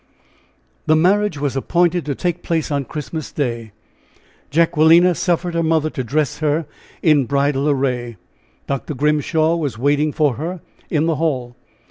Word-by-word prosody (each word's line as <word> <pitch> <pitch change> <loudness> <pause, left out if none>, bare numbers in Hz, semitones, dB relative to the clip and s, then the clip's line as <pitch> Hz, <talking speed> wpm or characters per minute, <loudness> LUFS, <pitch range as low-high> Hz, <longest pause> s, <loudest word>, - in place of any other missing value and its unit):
The 155 - +5
marriage 190 +2 +2
was 140 -2 -2
appointed 175 +5 +1
to 140 - -1
take 175 -1 -2
place 160 -2 -2 0.2
Christmas 155 0 -6
Day. 115 -6 -3 0.8
Jacquelina 165 +2 +4
suffered 175 0 -1
her 170 - 0
mother 160 -1 +1
to 130 - -4
dress 145 +3 -1
her 155 +1 0 0.4
in 150 -5 +4
bridal 140 +1 +1
array. 125 -5 -1 0.5
Dr. 140 +2 -4
Grimshaw 150 +3 +1
was 145 -9 -3
waiting 145 +4 +1
for 145 -6 +1
her 170 +5 -4 0.3
in 155 -1 +1
the 165 -2 0
hall. 130 -7 -2
155 Hz, 140 wpm, -19 LUFS, 140-165 Hz, 0.8 s, The